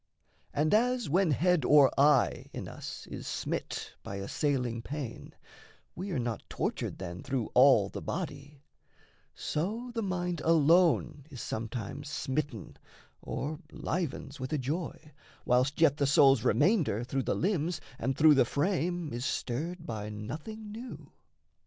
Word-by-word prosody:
And 155 +4 +1
as, 245 +2 +2
when 185 +1 +3
head 175 +2 +3
or 145 0 +6
eye 140 -2 +3
in - - -5
us - - -8
is - - -6
smit - - -3
By 100 - -6
assailing 120 +3 -1
pain, 135 -2 -6 0.6
we 190 +4 -5
are 175 - -1
not 120 -3 -2
tortured - - -2
then 90 -1 -6
Through 130 -5 -2
all 125 -6 +6
the - - -7
body, 145 -4 -5 0.7
so 220 +11 -3
the 230 - -1
mind 180 -4 -2
alone 165 -2 +3
Is 130 -5 -9
sometimes 120 +6 -5
smitten, 140 -6 -3 0.4
or 150 +2 -4
livens 155 -3 -3
with 130 0 -5
a - - +2
joy, 150 +3 -4 0.3
Whilst 125 +4 +2
yet 155 -3 +5
the 140 - +2
soul's 135 -3 +5
remainder 140 - +2
through 135 +2 -1
the - - -1
limbs 175 -3 0 0.2
And 130 +3 -1
through 155 0 +7
the 135 - +5
frame 175 - -1
is 120 +1 -3
stirred 165 +7 -3
by 105 -2 -4
nothing 160 - -7
new. 235 +4 -9
145 Hz, 140 wpm, -30 LUFS, 130-175 Hz, 0.7 s, through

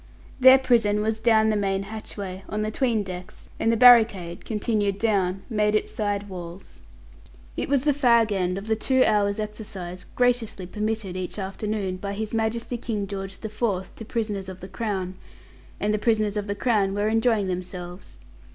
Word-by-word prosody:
Their 260 +1 +9
prison 225 -5 +2
was 220 0 -1
down 220 -1 +4
the - - 0
main 195 -1 0
hatchway, 200 -2 -7
on 210 +1 -2
the 215 - -2
'tween 230 -3 +1
decks, 180 -1 -9
and 225 - +2
the 230 - +1
barricade, 220 -8 +5
continued 210 -2 0
down, 195 -3 0
made 210 -2 +1
its 215 - 0
side 205 -1 -2
walls. 180 -1 -9 0.8
It - - -3
was 275 -2 +2
the 295 - +3
fag 235 -6 +3
end 185 -2 0
of 195 - -6
the 220 0 +1
two 260 +4 +3
hours' 200 0 +2
exercise 200 -4 -6
graciously 240 -6 +1
permitted 210 -1 -3
each 185 +1 -4
afternoon 195 -1 -3
by 200 +1 -4
His 215 +2 -4
Majesty 230 +2 -1
King 215 -4 -2
George 195 -1 -6
the 220 - -4
Fourth 210 -4 -2
to - - -7
prisoners 210 -4 -3
of 185 0 -9
the 185 - -8
Crown, 190 -2 -4 0.6
and 210 +1 0
the 210 - 0
prisoners 215 -2 +1
of 205 0 -2
the 200 - -2
Crown 205 -4 +1
were 205 +1 0
enjoying 225 -1 +2
themselves. 180 0 -6
210 Hz, 180 wpm, -25 LUFS, 195-225 Hz, 0.8 s, Their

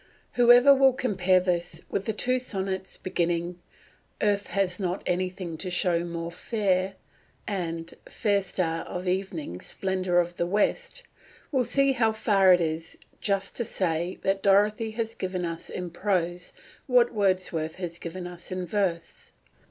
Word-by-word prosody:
Whoever 245 +3 +7
will 270 -1 +5
compare 190 -8 +2
this 175 -1 -2
with 195 - -2
the 220 - 0
two 255 +4 +1
sonnets 190 -5 -4
beginning 175 -1 -1 0.6
"Earth 205 -1 +1
has 190 -2 -1
not 185 -1 -2
anything 180 -2 -2
to 185 - -3
show 175 -1 +2
more 170 -1 -4
fair," 190 -1 0 0.5
and 170 -4 -3 0.2
"Fair 205 -2 +1
star 165 -4 -2
of 180 +1 -5
evening, 180 - -2
splendour 185 -2 -1
of 175 0 +1
the 170 - 0
West," 480 - 0 0.5
will 260 -4 +2
see 275 +3 +3
how 230 -4 +2
far 200 -3 +4
it 180 -1 +5
is 165 0 -3 0.2
just 195 -1 -1
to 235 - +1
say 175 -3 -1
that 195 0 +1
Dorothy 210 +3 +3
has 225 0 -3
given 185 -3 -3
us 165 -1 -5
in 180 -2 -5
prose 180 -1 -1 0.4
what 245 -2 +4
Wordsworth 185 -6 0
has 175 -2 -6
given 175 +2 -6
us 175 0 -8
in 185 0 -3
verse. 175 -3 -2
185 Hz, 150 wpm, -27 LUFS, 175-205 Hz, 0.6 s, Whoever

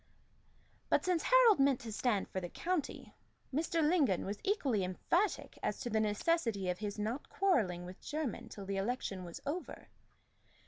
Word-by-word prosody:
But - - +3
since 360 -3 +2
Harold - - +6
meant 275 -2 +4
to 230 - -6
stand 215 -2 0
for 185 - -3
the 175 - -5
county, 345 - -3 0.4
Mr. 320 +1 +1
Lingon 295 - +2
was 200 +1 -4
equally 275 - +1
emphatic 335 - -1
as - - -2
to 240 -3 -3
the 220 - +2
necessity 215 - +1
of 180 - -6
his 210 -1 -4
not 220 +7 -3
quarrelling 210 - +1
with 180 +2 -10
Jermyn 300 -4 -4
till 200 - -8
the 195 0 -2
election 195 -3 -2
was 170 -1 -8
over. 330 +6 -5
240 Hz, 165 wpm, -34 LUFS, 195-330 Hz, 0.4 s, Harold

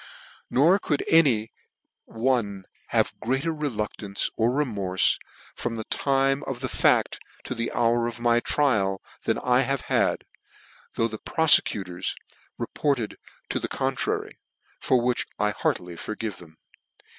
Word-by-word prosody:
Nor 165 +10 +4
could 145 -6 -1
any 125 -10 +4 0.5
one 110 -5 -1 0.2
have - - +1
greater 135 +7 -1
reluctance 105 -8 -2
or 115 +1 +2
remorfe, 105 -9 +1 0.3
from 120 -1 -4
the 110 - -4
time 135 +3 +1
of 125 -2 -4
the 130 - -1
facl - - +2 0.2
to - - -4
the 115 +1 -3
hour 120 0 +2
of 120 0 -6
my 120 0 +3
trial, 105 -9 +1 0.3
than - - +1
I 125 0 +2
have 135 0 -1
had, - - +1 0.7
though 115 - +2
the 110 -1 -7
profecutors 100 - +2 0.4
report 145 -2 0
ed 110 -3 -5 0.3
to - - 0
the - - -3
contrary, - - -2 0.4
for 130 - +2
which 120 +1 0
I 105 0 +1
heartily 90 -2 -2
forgive 110 -1 -5
them. 80 -2 -15
120 Hz, 135 wpm, -25 LUFS, 105-135 Hz, 0.7 s, Nor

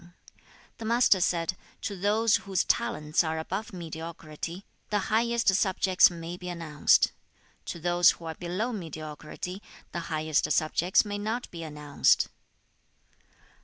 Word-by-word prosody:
The 225 - -6
Master 230 -4 +4
said, 170 +1 +1 0.3
'To 200 - -3
those 210 +4 +3
whose 195 -2 -1
talents 180 -11 +1
are 160 0 -2
above 190 +7 -4
mediocrity, 165 0 -7 0.2
the 210 0 -1
highest 235 0 +3
subjects 190 -1 +4
may 170 0 -7
be 180 0 -7
announced. 165 -4 +3 0.5
To 170 - -5
those 175 +1 +5
who 165 - -2
are 160 - -4
below 185 +9 -3
mediocrity, 160 +1 -6 0.3
the 175 - -3
highest 155 -1 0
subjects 170 +5 +3
may 205 0 -4
not 220 +4 -3
be 170 - -7
announced.' 150 -2 +2
175 Hz, 130 wpm, -28 LUFS, 160-205 Hz, 0.5 s, those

